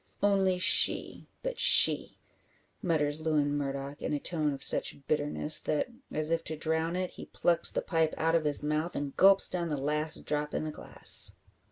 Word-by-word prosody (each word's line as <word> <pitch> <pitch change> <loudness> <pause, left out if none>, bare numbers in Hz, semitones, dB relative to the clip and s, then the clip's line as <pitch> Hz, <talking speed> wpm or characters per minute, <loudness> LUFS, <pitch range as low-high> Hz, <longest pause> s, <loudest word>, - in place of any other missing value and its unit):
"Only 195 -2 +1
she 185 +5 +4 0.2
but - - -5
she!" - - +5 0.6
mutters 155 -4 -1
Lewin 150 -2 -1
Murdock, 140 0 -6
in - - -4
a 145 - -2
tone 155 -1 -3
of 135 -1 -6
such 140 - +1
bitterness, 150 0 +2
that, 150 +11 -3 0.2
as 155 +1 -2
if 165 0 -1
to 155 - -5
drown 160 +2 -3
it, 185 0 -4
he - - -12
plucks 170 -1 +2
the - - -4
pipe 160 -3 -1
out 165 +1 -1
of 165 -2 0
his 145 -1 -1
mouth, 155 +3 -3
and 140 -1 -6
gulps 195 +1 +4
down 175 -2 -4
the 150 -3 -4
last 150 +3 -3
drop 150 0 -4
in - - -3
the 155 - -5
glass. - - 0
155 Hz, 185 wpm, -28 LUFS, 150-170 Hz, 0.6 s, she